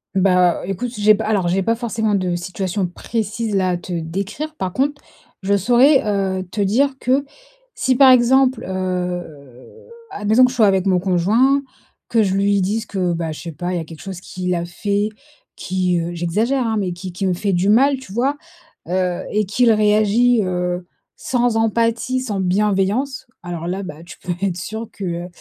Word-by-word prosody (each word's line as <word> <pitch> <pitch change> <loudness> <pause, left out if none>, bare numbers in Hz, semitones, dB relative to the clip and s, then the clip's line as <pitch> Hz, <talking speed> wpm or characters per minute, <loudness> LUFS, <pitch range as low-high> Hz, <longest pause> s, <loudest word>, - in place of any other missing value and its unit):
Bah 180 -2 +3
écoute, 195 +6 -3
si 220 -4 -7
j'ai 215 +1 +6
pas - - -4
alors, 200 -5 +1
j'ai 190 +2 +1
pas 225 +4 +2
forcément 225 -2 -1
de 185 -3 0
situation 185 +2 -3
précise 215 +3 -3
là, 185 -1 +2
à 180 - 0
te 175 +1 -7
décrire, 195 - -4
par 185 -7 -3
contre 285 +6 -1 0.4
je 200 +1 +2
saurais, 250 +7 +4
heu, 195 -2 -1
te 205 - -2
dire 245 +9 +2
que, 265 +3 +1 0.5
si, 255 - +1
par 265 -1 +8
exemple, 255 +1 +4
heu, 180 - -5 0.2
à - - -7
la 210 - -6
maison, 225 +5 +6
que 250 - 0
je 255 - -7
sois 220 -3 +5
avec 190 -1 +2
mon 185 -2 +3
conjoint 215 +10 +2 0.5
que 230 - +3
je 190 -1 0
lui 200 0 +2
dise 215 +4 -1
que 185 -4 -1
bah 165 -1 -3
je 155 - -8
sais 170 - -6
pas, 175 +4 -4
il - - -1
y - - -1
a - - -4
quelque 160 -1 -12
chose 190 -2 -7
qu'il 180 -1 -3
a 170 -1 -2
fait 200 +4 -1 0.5
qui, 180 -1 -1
heu, 170 +1 -3
j'exagère, 215 +10 0
hein 220 - 0
mais, 185 -4 -1
qui 180 +1 -7
qui 185 +3 -3
me 185 - +2
fait 195 +2 -1
du 180 +3 +1
mal, 270 +6 +4
tu 260 -7 -11
vois? 270 +6 0 0.5
Heu 180 0 -1
et 210 0 +1
qu'il 230 +4 +3
réagit, 215 +3 +3
heu, 180 -1 -2 0.3
sans 245 -2 0
empathie, 230 +3 +1
sans 215 -6 -3
bienveillance, 210 +8 0 0.2
alors 170 -1 -5
là, 190 +2 -3
bah, 160 -3 -9
tu - - -11
peux 180 - -5
être 185 -3 -1
sûr 220 +4 -5
que, 200 - -8
heu, 175 0 -3
195 Hz, 200 wpm, -20 LUFS, 180-230 Hz, 0.5 s, par